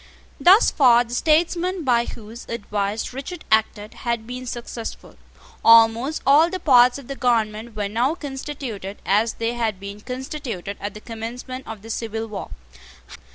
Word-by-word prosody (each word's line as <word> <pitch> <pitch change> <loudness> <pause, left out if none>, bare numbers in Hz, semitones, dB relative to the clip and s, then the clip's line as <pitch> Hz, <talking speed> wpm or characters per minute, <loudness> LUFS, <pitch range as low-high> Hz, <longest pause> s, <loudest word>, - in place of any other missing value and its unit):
Thus 385 +5 +6
far 245 -4 +5
the 240 0 -10
statesmen 340 +5 +1
by 240 -3 +2
whose 225 +1 -10
advice 210 -1 -3
Richard 310 +6 -7
acted 215 -1 +1
had 235 -2 -3
been 250 +2 -7
successful. 235 -1 -7 0.5
Almost 230 +6 +5
all 300 +5 +6
the 370 +1 -4
parts 250 -4 +5
of 275 -4 -11
the 275 - -5
government 225 -3 0
were 205 -1 -2
now 240 +9 0
constituted 270 - -6
as 215 +3 +2
they 230 +1 -2
had 225 -5 -2
been 200 +1 -8
constituted 250 - -5
at 205 0 -5
the 210 - -9
commencement 240 +3 -7
of 220 -2 -8
the 225 - -7
civil 225 0 -3
war. 210 -3 -7
235 Hz, 155 wpm, -22 LUFS, 220-265 Hz, 0.5 s, Thus